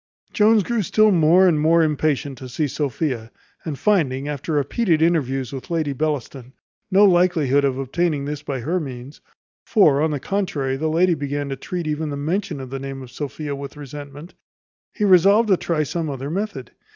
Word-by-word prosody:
Jones 215 -1 +4
grew 235 +3 -1
still 215 +3 +3
more 175 +2 +5
and 160 -4 +2
more 165 +2 +4
impatient 150 -2 0
to 130 - -8
see 150 +5 -1
Sophia; 130 -4 -3 0.3
and 155 -4 -5
finding, 140 -6 +1
after 150 +2 -4
repeated 160 - +1
interviews 140 -6 0
with 135 - -7
Lady 160 -4 -1
Bellaston, 135 -3 -4 0.4
no 200 +1 +5
likelihood 175 -7 +3
of 135 -2 0
obtaining 145 +2 -1
this 145 0 -4
by 135 -4 -4
her 170 +9 -1
means 130 -2 -8 0.4
(for, 155 - +4
on 160 - +2
the 145 -2 -2
contrary, 150 -8 -2
the 155 +4 -1
lady 175 +3 +3
began 145 -1 -3
to 135 - -3
treat 175 +5 -5
even 155 0 -2
the 145 - -4
mention 160 +1 -2
of 130 -1 -8
the 135 - -4
name 135 0 -6
of 125 - -12
Sophia 145 +2 -5
with 140 +1 -8
resentment), 145 +3 -9 0.6
he 210 - -1
resolved 200 +4 +5
to 190 - +6
try 165 -3 -1
some 160 +2 -3
other 135 +1 -5
method. 190 - -4
150 Hz, 185 wpm, -21 LUFS, 135-175 Hz, 0.6 s, to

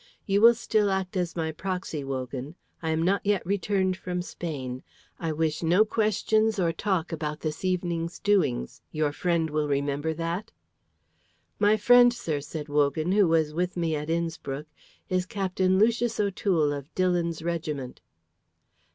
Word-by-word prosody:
You 200 0 +2
will 235 +1 +8
still 215 -2 +1
act 190 -1 -2
as 180 -2 -1
my 160 -2 -1
proxy, 180 -3 -4
Wogan. 135 +2 -5 0.3
I 160 - -2
am 160 +1 +1
not 195 +3 +1
yet 205 -3 +1
returned 190 -1 0
from 180 -1 -4
Spain. 130 -8 -5 0.4
I 165 -2 -2
wish 155 0 -1
no 175 +6 +4
questions 220 0 +1
or 175 -3 +2
talk 180 -1 -1
about 150 -1 -4
this 155 +2 -4
evening's 175 -2 -1
doings. 165 - 0
Your 155 -1 0
friend 165 0 0
will 150 0 0
remember 145 +2 -1
that?" 170 +6 -3 1.1
"My 210 +1 +4
friend, 245 +3 +7
sir," 165 -11 -3
said 150 +1 -6
Wogan, 150 +3 +1
"who 200 -1 +4
was 160 -2 +2
with 180 +2 -2
me 165 -2 0
at 150 +1 -4
Innspruck, 165 -4 -2 0.4
is 185 0 0
Captain 190 -2 +1
Lucius 230 +2 +2
O'Toole 185 -7 +1
of 140 0 -7
Dillon's 175 -3 0
regiment." 155 -6 -4
170 Hz, 150 wpm, -27 LUFS, 155-195 Hz, 1.1 s, will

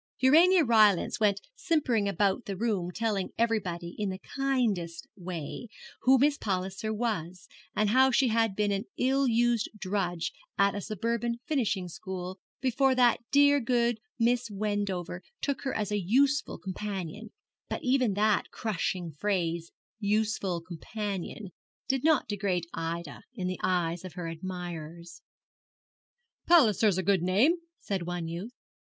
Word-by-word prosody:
Urania 330 +7 +6
Rylance 215 -3 +4
went 205 -2 +2
simpering 255 - +1
about 200 +3 +1
the 195 -2 -4
room 200 -5 0
telling 205 0 -1
everybody, 185 -7 -1
in 205 -2 0
the 185 - -4
kindest 220 -11 -1
way, 180 +3 -6 0.3
who 265 +1 +6
Miss 285 +2 +3
Palliser 190 +2 -2
was, 190 -6 -3 0.3
and 210 -1 +2
how 260 +2 +6
she 260 0 +3
had 225 -3 +2
been 210 0 +1
an 200 0 -1
ill 270 +1 +2
used 235 -1 +2
drudge 185 -4 -2 0.2
at 200 0 +4
a 205 - -4
suburban 235 +3 -2
finishing 215 -11 0
school, 185 +1 -6 0.2
before 265 +1 +2
that 245 -2 +4
dear 285 +1 +6
good 235 -2 +1 0.2
Miss 240 0 +1
Wendover 200 -4 -2 0.2
took 280 -2 -2
her 265 - -1
as 210 -2 -2
a 205 -1 0
useful 275 +9 +2
companion; 200 +1 -5 0.4
but - - -4
even 255 -5 +2
that 210 +1 +2
crushing 180 -5 -2
phrase, 170 -5 -1 0.3
'useful 205 -4 0
companion,' 195 +3 -5 0.4
did 270 -2 0
not 315 -3 +3
degrade 195 -4 -1
Ida 165 +1 -4
in 190 -6 -4
the 185 0 -3
eyes 175 -2 0
of 185 -3 -8
her 175 -2 -5
admirers. 170 -1 -7 1.3
'Palliser's 220 - +5
a 190 - 0
good 190 -1 +3
name,' 215 - +3 0.2
said 190 -4 -3
one 175 -2 -3
youth. 175 +8 -5
205 Hz, 140 wpm, -29 LUFS, 180-235 Hz, 1.3 s, Urania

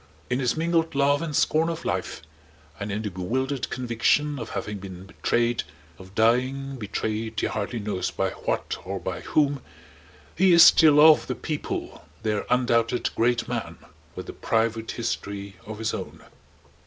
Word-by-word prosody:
In 125 - +1
his 125 +2 0
mingled 165 -1 +1
love 140 +1 +3
and 160 -3 -3
scorn 160 +4 +2
of 165 - -5
life - - -3 0.6
and 100 0 -4
in 105 +2 -3
the 105 - -3
bewildered 130 +9 -2
conviction 130 +4 +1
of 115 - -6
having 105 -1 -4
been 95 -1 -9
betrayed, 120 +4 0 0.4
of 95 +1 -14
dying 130 +4 +1
betrayed 110 0 -3
he - - 0
hardly 110 +3 -3
knows 105 -4 -2
by - - -1
what - - -3
or 95 +1 -4
by 90 0 -4
whom, 145 -3 +1 0.7
he 185 +1 +5
is 170 -1 +9
still 155 -3 +7
of 155 0 +7
the - - -2
People, 150 -2 -5 0.2
their 105 -2 -1
undoubted 120 -1 +1
Great 120 +1 +1
Man 120 -3 -4 0.4
with - - -7
a - - -7
private 115 0 -1
history 100 -4 -4
of 110 0 -6
his 110 0 -2
own. - - -7
120 Hz, 160 wpm, -25 LUFS, 105-140 Hz, 0.7 s, is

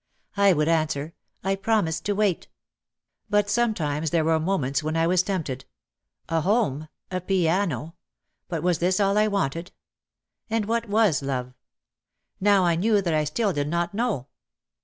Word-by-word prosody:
I 200 -1 +5
would 150 -1 +1
answer. 155 -1 0 0.3
"I 195 +1 +1
promised 195 -5 0
to 205 - 0
wait." 200 -4 0 0.8
But 205 -1 +2
sometimes 165 -11 0
there 165 -1 +1
were 160 0 +3
moments 155 -6 0
when 155 +1 -2
I 165 - +3
was 180 +1 +3
tempt 185 -4 -2
ed. 130 +1 -7 0.6
A 165 -1 0
home! 170 - 0 0.2
A 185 0 -2
piano! 170 - 0 0.5
But 165 -3 -3
was 180 -2 +1
this 185 +2 +1
all 200 0 +2
I 215 0 +4
wanted? 175 -4 -2 0.8
And 225 -1 0
what 230 +1 -1
was 205 -8 +3
love? 130 -2 -3 0.9
Now 200 -1 +4
I 170 - +3
knew 210 +3 +3
that 175 -4 -1
I 155 -1 +1
still 200 +6 0
did 145 -2 -1
not 170 +3 -1
know. 215 - -1
175 Hz, 160 wpm, -25 LUFS, 155-205 Hz, 0.9 s, I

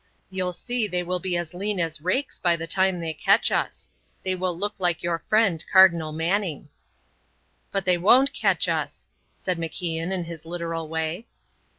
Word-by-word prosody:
You'll 185 -1 -1
see 240 +4 -1
they 180 -2 -2
will 180 +1 -2
be 180 -1 -1
as 175 0 -4
lean 200 +2 -2
as 160 -3 -1
rakes 255 - -1
by 175 -2 +3
the 165 0 -5
time 190 +2 +1
they 165 -1 -3
catch 200 +7 +3
us. - - -2 0.3
They 185 - 0
will 180 -2 -2
look 205 +2 -2
like 175 -3 0
your 170 -1 -1
friend, 205 -7 +3
Cardinal 170 -5 +6
Manning." 165 0 -1 1.0
"But 195 -2 -1
they 180 -1 +3
won't 255 +9 +5
catch - - +1
us," - - -3 0.3
said 180 -2 -3
MacIan, 165 +1 -3
in 185 -2 -1
his 165 -2 -8
literal 165 -1 -4
way. 160 +6 -3
180 Hz, 175 wpm, -25 LUFS, 165-190 Hz, 1.0 s, Cardinal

